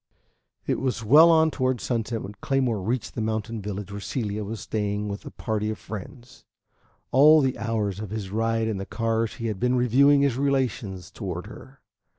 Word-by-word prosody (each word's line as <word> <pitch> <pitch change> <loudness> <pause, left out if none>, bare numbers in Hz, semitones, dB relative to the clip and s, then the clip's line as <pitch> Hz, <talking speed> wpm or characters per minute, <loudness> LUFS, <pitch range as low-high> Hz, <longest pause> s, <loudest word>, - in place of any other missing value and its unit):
VI - - -1
It - - -2
was 125 -3 -2
well 150 +9 +7
on 160 -1 +5
toward 130 -3 0
sunset 115 -1 -2
when 100 - -7
Claymore 130 -6 0
reached 115 +4 -2
the 115 - -3
mountain 110 0 -2
village 100 -1 -5
where 100 0 -6
Celia 105 0 -3
was 110 +2 -5
staying 105 -1 -2
with 100 0 -6
a - - -4
party 105 -1 -3
of 110 - -3
friends. 120 +4 -10 0.7
All 150 +4 +7
the 130 -3 +1
hours 110 -4 -2
of 105 -2 -6
his 105 -3 -5
ride 115 +1 0
in 110 -3 -2
the 95 - -4
cars 115 0 -1
he 115 - -6
had 105 -4 -2
been 125 +3 +2
reviewing 135 +4 +4
his 140 -4 +1
relations 120 -10 -1
toward 90 -4 -5
her. 130 +5 -13
115 Hz, 190 wpm, -25 LUFS, 105-130 Hz, 0.7 s, well